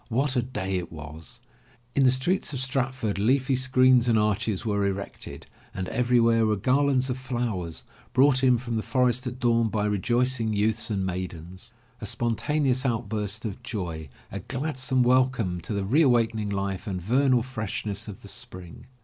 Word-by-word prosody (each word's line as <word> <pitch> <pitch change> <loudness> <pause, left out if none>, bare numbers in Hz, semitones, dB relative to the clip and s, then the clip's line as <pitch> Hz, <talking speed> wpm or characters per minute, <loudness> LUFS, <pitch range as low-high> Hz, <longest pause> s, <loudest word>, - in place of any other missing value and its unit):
What 130 +4 +1
a 125 - +3
day 95 -6 -3
it 90 - -5
was! 80 +10 -9 0.5
In 140 - +3
the - - +7
streets 150 +6 0
of 135 - -2
Stratford 130 -5 -1
leafy 130 +5 +2
screens 130 -1 +4
and 115 -2 +4
arches 105 0 0
were 100 -2 0
erected, 100 0 -4 0.3
and 95 -1 -3
everywhere 115 -2 +3
were 105 - +2
garlands 130 +4 +2
of 125 - -4
flowers, 120 -10 -3 0.3
brought 130 0 +4
in 125 -2 +5
from 115 -1 -3
the - - 0
forest 125 +1 +1
at 125 0 -5
dawn 115 -3 +2
by 105 -1 -1
rejoicing 115 +3 +1
youths 110 +3 0
and 95 -3 -1
maid 90 -1 -3
ens. 90 +8 -11 0.3
A 105 - -6
spontaneous 125 +4 0
outburst 110 -3 -2
of 105 -3 -5
joy, 85 - -5 0.2
a 100 - -4
gladsome 130 - -1
welcome 125 -8 +2
to - - -7
the 100 -2 -1
re 135 +11 +3
awakening 115 -6 +2
life 100 +1 -3
and 95 -2 -2
vernal 125 +5 +2
freshness 110 -4 -4
of 100 -3 -9
the - - -10
Spring! 95 -5 -8
115 Hz, 170 wpm, -26 LUFS, 100-130 Hz, 0.5 s, the